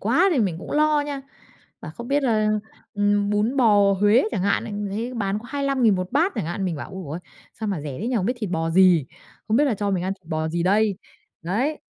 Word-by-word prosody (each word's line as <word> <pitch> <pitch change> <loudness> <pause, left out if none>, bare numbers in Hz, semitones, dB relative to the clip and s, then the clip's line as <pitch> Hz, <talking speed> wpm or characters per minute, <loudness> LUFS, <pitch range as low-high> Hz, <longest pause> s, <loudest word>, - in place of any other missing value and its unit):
quá 255 - +3
thì 285 - +1
mình 190 -8 0
cũng - - -9
lo 305 0 +3
nha. 285 -2 -4 0.6
Bảo 155 - -8
không 235 +1 -7
biết 285 +1 +1
là, 215 -4 +2 0.5
ừm, 205 0 +1
bún 210 +5 0
bò 205 -6 +5
Huế 205 +6 +4
chẳng 195 -6 -2
hạn, 200 +1 +1
lại - - -6 0.2
thấy 230 +5 -4
bán 200 -2 -1
có 220 - -13
25.000 275 -5 +2
1 185 +2 -4
bát 335 +8 +2
chẳng - - -2
hạn, 175 +4 -3
mình 175 -4 -2
bảo: - - -7
"Ồ 190 -1 -7
ôi! 160 - -4 0.4
Sao 220 - -2
mà 195 -6 -2
rẻ 145 -3 -6
thế 225 - -2
nhỉ? 250 - 0
Không 190 -4 0
biết 245 - 0
thịt 210 -5 -4
bò 165 -1 -1
gì, 175 -4 +5 0.4
không 215 - +2
biết 290 - +4
là 270 -6 +1
cho 205 0 -2
mình 185 -3 0
ăn 190 - -1
thịt 190 -3 -31
bò 155 0 -1
gì 170 +1 -1
đây?" 200 +2 +2 0.5
Đấy. 245 - -1
205 Hz, 250 wpm, -23 LUFS, 185-245 Hz, 0.6 s, bò